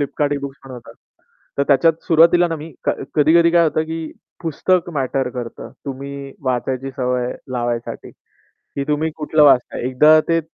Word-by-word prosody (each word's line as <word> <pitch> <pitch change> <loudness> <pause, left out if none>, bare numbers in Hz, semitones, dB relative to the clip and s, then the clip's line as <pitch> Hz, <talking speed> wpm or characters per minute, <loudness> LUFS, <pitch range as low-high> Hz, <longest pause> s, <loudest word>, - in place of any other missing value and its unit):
Flipkart 145 +1 -1
e-books 140 -1 -6
म्हणून 130 -2 -9
होता. - - -13 0.7
तर - - +3
त्याच्यात 155 +4 +5
सुरुवातीला 170 +2 +4
ना 165 - -3
मी 155 +2 -10
क - - +2 0.2
कधी-कधी 165 +3 +4
काय 170 0 +4
होतं, 155 0 +1
की 160 0 -6 0.3
पुस्तक 175 +2 0
मॅटर 135 -3 -1
करतं. 120 -2 -7
तुम्ही 140 0 -7
वाचायची 130 +1 -2
सवय 125 -1 -1 0.2
लावायसाठी 120 -1 -4
की - - -33 0.5
तुम्ही 150 +2 0
कुठलं 155 0 +1
वाचताय? 130 -4 +3
एकदा 150 +5 +5
ते 165 0 +2
145 Hz, 155 wpm, -19 LUFS, 130-160 Hz, 0.7 s, त्याच्यात